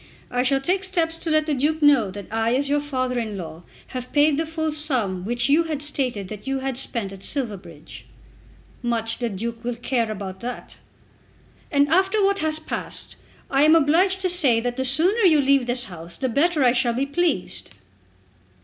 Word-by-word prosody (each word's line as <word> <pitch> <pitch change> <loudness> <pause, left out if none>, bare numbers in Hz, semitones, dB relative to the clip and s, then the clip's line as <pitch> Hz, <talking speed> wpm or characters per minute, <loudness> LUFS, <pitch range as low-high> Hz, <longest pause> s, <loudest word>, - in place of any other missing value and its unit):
I 245 - +1
shall 270 +2 +2
take 370 +6 0
steps 335 -4 0
to 330 - -4
let 310 -1 +2
the 305 - -1
Duke 295 +4 0
know 275 -8 +5
that 200 +1 -8
I 225 +2 +1
as 280 +1 0
your 290 +1 +2
father 255 -4 -2
in 215 -3 -4
law 165 -2 -8 0.3
had 255 -1 -6
paid 295 0 +4
the 320 +2 -2
full 315 -1 -2
sum 250 - -1
which 240 +2 0
you 310 +4 +3
had 305 -3 -3
stated 250 -9 -2
that 210 +4 -9
you 270 0 0
had 265 -1 -3
spent 225 -7 0
at 195 - -11
Silverbridge." 195 - -4 0.8
"Much 230 -2 0
the 240 -2 -1
Duke 230 +3 -5
will 245 0 -2
care 235 -2 -1
about 190 -2 -6
that." 245 +1 -7 0.9
"And 285 0 +3
after 380 +5 +2
what 395 0 +2
has 310 0 0
passed 315 - -6 0.4
I 275 0 +3
am 310 +2 +6
obliged 345 +5 +3
to 370 - +1
say 285 -10 +3
that 245 +1 -3
the 260 0 -2
sooner 335 - +2
you 335 -7 +5
leave 275 -2 +3
this 245 0 0
house 170 -3 -9
the 260 - -1
better 300 +4 +2
I 245 - +5
shall 240 -1 +1
be 260 +4 0
pleased." 280 - -1
265 Hz, 195 wpm, -23 LUFS, 230-310 Hz, 0.9 s, am